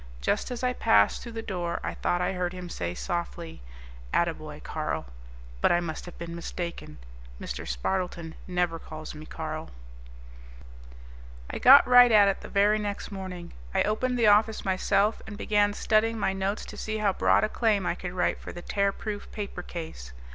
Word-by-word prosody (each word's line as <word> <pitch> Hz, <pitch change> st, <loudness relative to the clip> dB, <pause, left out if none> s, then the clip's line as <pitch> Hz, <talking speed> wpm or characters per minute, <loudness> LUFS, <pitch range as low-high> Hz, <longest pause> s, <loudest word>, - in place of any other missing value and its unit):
Just -, -, 0 dB
as 245 Hz, 0 st, -5 dB
I 250 Hz, 0 st, +2 dB
passed 100 Hz, -, +3 dB
through 235 Hz, -, -8 dB
the 225 Hz, 0 st, -5 dB
door 175 Hz, -5 st, -3 dB
I -, -, -2 dB
thought 175 Hz, -, 0 dB
I 180 Hz, -, 0 dB
heard 180 Hz, -1 st, -2 dB
him 180 Hz, -1 st, -7 dB
say 85 Hz, -, -4 dB
softly, 170 Hz, -, -4 dB, 0.5 s
"Attaboy, -, -, -1 dB
Carl," -, -, -3 dB, 0.6 s
but -, -, +4 dB
I 175 Hz, -, +4 dB
must 170 Hz, 0 st, -5 dB
have 175 Hz, -, -10 dB
been 170 Hz, 0 st, -6 dB
mistaken. 170 Hz, -, -6 dB, 0.4 s
Mr. -, -, -5 dB
Spardleton 165 Hz, -, -2 dB
never 175 Hz, -2 st, 0 dB
calls 155 Hz, 0 st, -8 dB
me 155 Hz, 0 st, -10 dB
Carl. 155 Hz, -1 st, -5 dB, 1.8 s
I -, -, -4 dB
got 270 Hz, +3 st, +9 dB
right 245 Hz, -1 st, +8 dB
at 210 Hz, -2 st, +7 dB
it 195 Hz, -, 0 dB
the -, -, -9 dB
very 205 Hz, +2 st, +3 dB
next 205 Hz, 0 st, -4 dB
morning. 185 Hz, -3 st, -7 dB, 0.2 s
I -, -, +4 dB
opened 250 Hz, +4 st, 0 dB
the 235 Hz, -, +3 dB
office 215 Hz, +1 st, +4 dB
myself 195 Hz, +3 st, +2 dB
and 210 Hz, -2 st, -7 dB
began 205 Hz, -1 st, +2 dB
studying 220 Hz, +2 st, +1 dB
my 195 Hz, -2 st, 0 dB
notes 195 Hz, +2 st, -2 dB
to -, -, -10 dB
see 220 Hz, 0 st, -3 dB
how 205 Hz, -2 st, +2 dB
broad -, -, +3 dB
a -, -, +3 dB
claim 215 Hz, -5 st, +1 dB
I -, -, +1 dB
could 180 Hz, 0 st, -6 dB
write 180 Hz, -, 0 dB
for -, -, -8 dB
the 175 Hz, -, -9 dB
Tearproof 200 Hz, +1 st, -2 dB
Paper 200 Hz, -4 st, -5 dB
Case. 160 Hz, -, -8 dB
190 Hz, 180 wpm, -27 LUFS, 170-215 Hz, 1.8 s, got